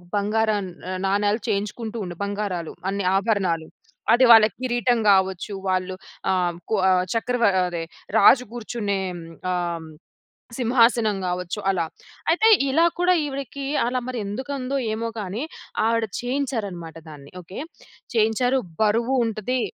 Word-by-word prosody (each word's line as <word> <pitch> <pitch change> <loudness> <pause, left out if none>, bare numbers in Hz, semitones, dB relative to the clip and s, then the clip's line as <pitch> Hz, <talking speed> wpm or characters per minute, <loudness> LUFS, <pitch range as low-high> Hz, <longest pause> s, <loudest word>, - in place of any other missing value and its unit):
బంగారం 210 0 +1 0.2
నా 185 - -3 0.2
నాణాలు 205 +2 +1
చేయించుకుంటూ 215 +2 -2
ఉండె. 175 -1 -6
బంగారాలు, 200 -5 -3 0.2
అన్ని 200 0 -2
ఆభరణాలు. 190 -6 0 0.5
అది 250 +2 +5
వాళ్ళకి 220 -2 +7
కిరీటం 240 -1 +1
గావచ్చు, 190 0 +2 0.2
వాళ్ళు 185 0 -1 0.4
ఆహ్, 175 -2 +1
కొ 220 - +2
ఆహ్, 185 -1 +3
చక్రవ 240 +1 0 0.2
అదే 170 -2 -4 0.3
రాజు 250 +2 +7
గూర్చునే 215 -4 -3
హ్మ్. 170 -1 -8 0.3
ఆ! - - +1 0.2
హ్మ్. 160 -1 -10 0.7
సింహాసనం 235 -3 +3
గావచ్చు 180 +3 -3
అలా, 175 -3 +1 0.5
అయితే 435 +7 +4 0.2
ఇలా 320 +5 +4
కూడా 360 +1 +4
ఈవిడకీ, 275 -1 -5 0.2
అలా 250 +1 0
మరెందుకుందో 255 +4 -3 0.2
ఏమో 230 +1 -2
కానీ, 205 +5 -4 0.4
ఆవిడ 230 0 +2 0.2
చేయించారనమాట 225 - -3
దాన్ని 145 -2 -12
ఓకే. 185 +3 -10 0.6
చేయించారు, 235 +4 +2 0.2
బరువు 230 +5 +2
ఉంటదీ. 225 +3 -1
215 Hz, 125 wpm, -23 LUFS, 190-245 Hz, 0.7 s, వాళ్ళకి